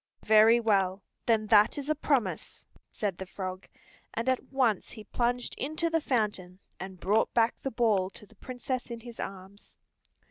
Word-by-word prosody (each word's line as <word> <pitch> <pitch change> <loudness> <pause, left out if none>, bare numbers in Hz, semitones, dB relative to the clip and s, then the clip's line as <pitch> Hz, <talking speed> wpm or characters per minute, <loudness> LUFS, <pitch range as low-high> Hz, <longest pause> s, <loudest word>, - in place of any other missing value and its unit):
"Very 220 +2 +6
well, 195 -4 +1 0.2
then 220 -2 +3
that 215 +2 +5
is 285 -1 -4
a 310 - +3
promise," 280 -5 -1 0.2
said 200 -5 -3
the 190 - -6
frog, 185 -1 -6 0.5
and 230 - -2
at 260 -1 +1
once 250 -7 +1
he 215 - -10
plunged 245 +3 -1
into 310 +4 -1
the 325 0 +2
fountain 205 -9 -1 0.2
and 190 0 -8
brought 205 +5 +2
back 230 0 +4
the 270 - -2
ball 220 -6 +1
to 205 - -13
the 215 - -22
Princess 255 +3 -5
in 235 -1 -6
his 235 0 -11
arms. 195 +1 -9
220 Hz, 170 wpm, -29 LUFS, 195-245 Hz, 0.5 s, Very